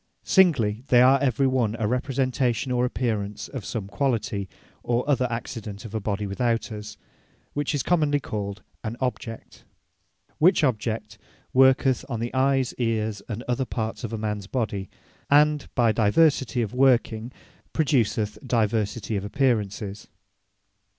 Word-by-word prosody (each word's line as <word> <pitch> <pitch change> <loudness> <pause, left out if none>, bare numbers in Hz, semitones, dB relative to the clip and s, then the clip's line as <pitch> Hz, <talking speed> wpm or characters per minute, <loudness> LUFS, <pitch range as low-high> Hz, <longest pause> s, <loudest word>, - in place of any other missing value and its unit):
Singly, 125 - +3
they 120 - +5
are 135 +2 +6
every 135 0 +2
one 125 -5 +1
a 110 -2 0
Representation 125 0 0
or 125 0 +2
Apparence, 110 -5 -2
of 130 -6 -7
some 105 -1 -4
quality, 100 -3 -1 0.3
or 120 +2 -1
other 130 -3 +2
Accident 115 -3 -6
of 110 - -9
a 110 - -1
body 105 0 -2
without 115 +4 -1
us; 105 0 -7 0.6
which 145 +1 -1
is 140 - -1
commonly 150 -4 +2
called 100 -5 -5 0.2
an 115 +1 -4
Object. 120 -3 -5 0.8
Which 175 +1 +5
Object 110 -4 -1 0.3
worketh 130 0 +4
on 120 -4 -3
the 120 +1 -3
Eyes, 135 -1 +2
Eares, 110 -3 -1
and 115 +2 -4
other 125 +1 -1
parts 110 -2 -4
of 115 -1 -3
mans 105 -2 -3
body; 105 -6 -2 0.4
and 150 0 +4
by 120 -3 +4
diversity 125 +3 +3
of 105 - -5
working, 120 -3 +2 0.4
produceth 115 -8 +1
diversity 110 -1 0
of 100 - -3
Apparences. 105 -4 -1
120 Hz, 135 wpm, -25 LUFS, 105-130 Hz, 0.8 s, are